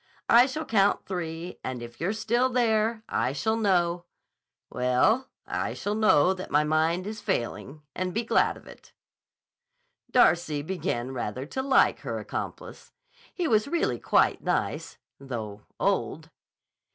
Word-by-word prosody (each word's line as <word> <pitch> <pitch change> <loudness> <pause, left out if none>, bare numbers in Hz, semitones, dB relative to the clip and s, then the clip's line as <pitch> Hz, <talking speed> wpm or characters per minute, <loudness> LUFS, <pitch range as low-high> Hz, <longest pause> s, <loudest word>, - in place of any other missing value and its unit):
I 240 +2 +7
shall 305 +4 -4
count 200 -2 +2
three, 170 -2 -5
and 125 -2 -4
if 120 +2 -11
you're 180 +4 0
still 235 +4 +1
there 225 -2 +1
I 130 - 0
shall 220 +11 0
know—well, 175 - -1 0.2
I - - -3
shall 205 - -2
know 190 -5 +4
that 185 0 -8
my 150 +1 +3
mind 160 +4 +1
is 215 +1 -6
failing—and 150 +8 -3
be 225 +5 -1
glad 230 - +2
of - - -17
it." - - -15 1.2
Darcy 170 - +3
began 155 -8 -3
rather 125 +1 -4
to 265 - -4
like 270 0 +3
her - - -4
accomplice. - - -7 0.4
He 355 -3 -2
was 215 -2 +2
really 335 +3 0
quite - - +2
nice—though 110 -6 -4 0.2
old. - - -1
180 Hz, 130 wpm, -27 LUFS, 145-220 Hz, 1.2 s, I